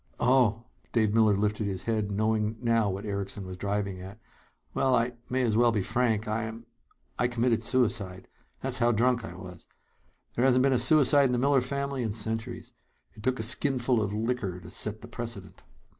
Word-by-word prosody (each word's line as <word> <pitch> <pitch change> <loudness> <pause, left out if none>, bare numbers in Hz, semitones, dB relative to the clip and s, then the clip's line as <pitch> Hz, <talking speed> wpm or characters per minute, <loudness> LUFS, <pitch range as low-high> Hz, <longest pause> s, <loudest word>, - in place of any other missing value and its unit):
"Oh!" 120 -3 +3 0.3
Dave 110 -3 +2
Miller 110 -3 +4
lifted 105 +1 -1
his 95 -2 -4
head, 110 -3 -1
knowing 110 +1 0
now 115 -3 +2
what 100 +2 -4
Erickson 100 -1 -4
was 95 0 -7
driving 100 -1 -3
at. 95 +3 -10 0.5
"Well, 130 -1 +2
I 120 +1 +1 0.2
may 130 +1 +1
as 110 -3 +1
well 120 +1 +4
be 105 -4 0
frank. 115 -2 0
I'm 110 +1 -4 0.5
I 120 - +3
committed 120 -1 +1
suicide. 110 -7 0 0.3
That's 130 -1 0
how 120 0 +3
drunk 120 +1 +2
I 90 -6 -8
was. 90 -2 -11 0.7
There 120 - 0
hasn't 130 -1 +4
been 135 0 +3
a 125 - +3
suicide 140 +2 +5
in 125 - +1
the - - +1
Miller 135 +1 +3
family 140 +1 -3
in 110 -4 -2
centuries. 110 +1 -3 0.4
It - - -13
took 130 +3 0
a - - -1
skinful 125 0 +1
of 105 -1 -2
liquor 110 -4 -2
to 90 0 -11
set 110 +3 -1
the 120 - -9
precedent." 115 -5 -6
115 Hz, 190 wpm, -28 LUFS, 105-125 Hz, 0.7 s, suicide